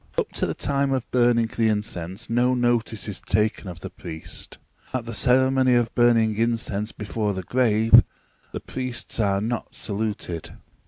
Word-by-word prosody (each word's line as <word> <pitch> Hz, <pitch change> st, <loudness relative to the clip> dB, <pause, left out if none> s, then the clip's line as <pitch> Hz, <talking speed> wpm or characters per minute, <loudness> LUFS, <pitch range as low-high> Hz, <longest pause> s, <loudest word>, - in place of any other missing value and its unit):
Up -, -, -1 dB
to -, -, -1 dB
the -, -, -3 dB
time 140 Hz, -1 st, 0 dB
of 130 Hz, -3 st, -1 dB
burning 120 Hz, -2 st, +3 dB
the 115 Hz, 0 st, 0 dB
incense 105 Hz, -1 st, -2 dB
no 125 Hz, +2 st, +2 dB
notice 120 Hz, -3 st, 0 dB
is 105 Hz, -, -4 dB
taken 105 Hz, -1 st, 0 dB
of 85 Hz, -2 st, -8 dB
the -, -, -7 dB
priest. 80 Hz, -3 st, -6 dB, 0.4 s
At 125 Hz, -3 st, -2 dB
the 115 Hz, -, -6 dB
ceremony 130 Hz, +2 st, +3 dB
of 120 Hz, -1 st, +1 dB
burning 115 Hz, -3 st, +3 dB
incense 115 Hz, -2 st, 0 dB
before 105 Hz, -1 st, -3 dB
the 95 Hz, -, -4 dB
grave, 115 Hz, 0 st, +5 dB, 0.5 s
the -, -, -5 dB
priests 125 Hz, -2 st, -3 dB
are 100 Hz, -2 st, +1 dB
not 115 Hz, +2 st, -4 dB
saluted. 100 Hz, -6 st, -4 dB
115 Hz, 160 wpm, -24 LUFS, 105-120 Hz, 0.5 s, grave